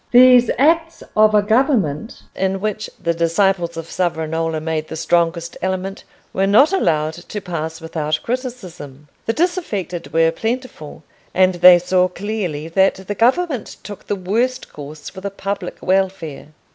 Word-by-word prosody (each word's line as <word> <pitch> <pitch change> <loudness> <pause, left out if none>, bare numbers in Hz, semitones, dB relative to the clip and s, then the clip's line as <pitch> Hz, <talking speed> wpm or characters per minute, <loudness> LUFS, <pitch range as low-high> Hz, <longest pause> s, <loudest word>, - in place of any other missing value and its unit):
These 250 -1 +7
acts 325 +4 +2
of 215 0 +5
a 205 - +4
government 220 - 0
in 190 0 -1
which 215 +1 -3
the 170 - 0
disciples 170 +1 +1
of 165 - -5
Savonarola 160 -2 -1
made 155 0 -3
the - - -7
strongest 170 +1 0
element 190 +1 -3 0.3
were 195 +1 +1
not 270 - +5
allowed 155 - +1
to 175 +5 -7
pass 160 -4 -5
without 155 -2 -2
criticism. 180 - -6 0.2
The 225 - +1
disaffected 205 - -2
were 165 +1 +3
plentiful, 225 - -5 0.3
and 185 0 +4
they 175 0 +8
saw 180 +1 +2
clearly 180 -5 -4
that 190 +3 +3
the 190 +2 -6
government 255 - 0
took 205 -2 -10
the 205 - 0
worst 230 +7 -2
course 150 +1 -9
for 190 - -9
the 200 - -3
public 195 -1 -5
welfare. 185 -7 -1
185 Hz, 145 wpm, -19 LUFS, 165-215 Hz, 0.3 s, they